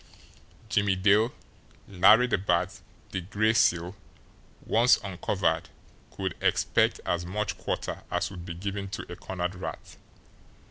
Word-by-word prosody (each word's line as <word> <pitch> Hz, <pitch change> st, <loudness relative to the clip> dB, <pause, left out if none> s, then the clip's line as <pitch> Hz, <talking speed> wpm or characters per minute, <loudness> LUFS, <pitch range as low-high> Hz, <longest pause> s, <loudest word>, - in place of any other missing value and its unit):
Jimmie 100 Hz, -2 st, +2 dB
Dale, 105 Hz, +5 st, +3 dB, 0.6 s
Larry 105 Hz, +5 st, +6 dB
the 125 Hz, -6 st, 0 dB
Bat, 90 Hz, -1 st, 0 dB, 0.3 s
the 95 Hz, -, -2 dB
Gray 105 Hz, +5 st, +1 dB
Seal, 90 Hz, -4 st, +2 dB, 0.7 s
once 120 Hz, +3 st, +5 dB
uncovered, 95 Hz, -3 st, -1 dB, 0.4 s
could 95 Hz, -3 st, -4 dB
expect -, -, +2 dB
as 85 Hz, 0 st, -1 dB
much 105 Hz, +4 st, -3 dB
quarter -, -, -4 dB
as -, -, -1 dB
would 90 Hz, -3 st, -8 dB
be 85 Hz, -1 st, -6 dB
given 100 Hz, +2 st, -4 dB
to 95 Hz, -, -6 dB
a -, -, -5 dB
cornered 90 Hz, 0 st, -4 dB
rat. 90 Hz, -, -8 dB
95 Hz, 130 wpm, -28 LUFS, 90-105 Hz, 0.7 s, Larry